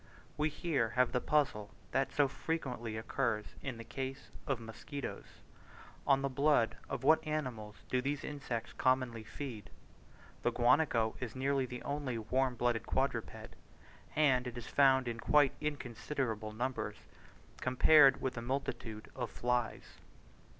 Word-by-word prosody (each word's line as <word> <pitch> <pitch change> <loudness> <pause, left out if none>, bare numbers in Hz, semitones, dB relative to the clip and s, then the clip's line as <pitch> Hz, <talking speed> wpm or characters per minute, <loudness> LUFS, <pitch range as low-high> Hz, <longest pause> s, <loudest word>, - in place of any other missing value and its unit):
We 150 +1 +1
here 145 -7 0
have 125 -1 +4
the 125 - 0
puzzle 130 -9 +1 0.2
that 135 +1 +1
so 145 -1 +3
frequently 125 -7 -3
occurs 110 -1 -1 0.2
in 135 -4 -4
the 115 - -7
case 135 +3 -6 0.2
of 135 -4 0
musquitoes 120 +5 -7 0.8
on 135 -1 +4
the - - +2
blood 140 -3 +3
of - - -3
what 155 +3 +5
animals 125 -9 -3
do 125 - +1
these 140 +2 -2
insects 135 -6 -4
commonly 130 -3 +1
feed? 120 -3 -7 0.7
The - - +2
guanaco 120 -3 +3
is 125 -3 -5
nearly 135 0 +1
the 125 0 -7
only 140 -4 -2
warm 125 +3 0
blooded 120 -2 0
quadruped, - - -1 0.7
and 130 -5 +3
it 125 0 -6
is 120 - -6
found 135 -2 +4
in 115 -1 -3
quite 145 +2 +4
inconsiderable 125 -5 -3
numbers 115 -2 -3 0.5
compared 135 +2 +6
with 130 - -1
the 115 - -5
multitude 120 -4 -3
of 120 -3 -3
flies. 120 -2 -2
130 Hz, 140 wpm, -34 LUFS, 115-140 Hz, 0.8 s, compared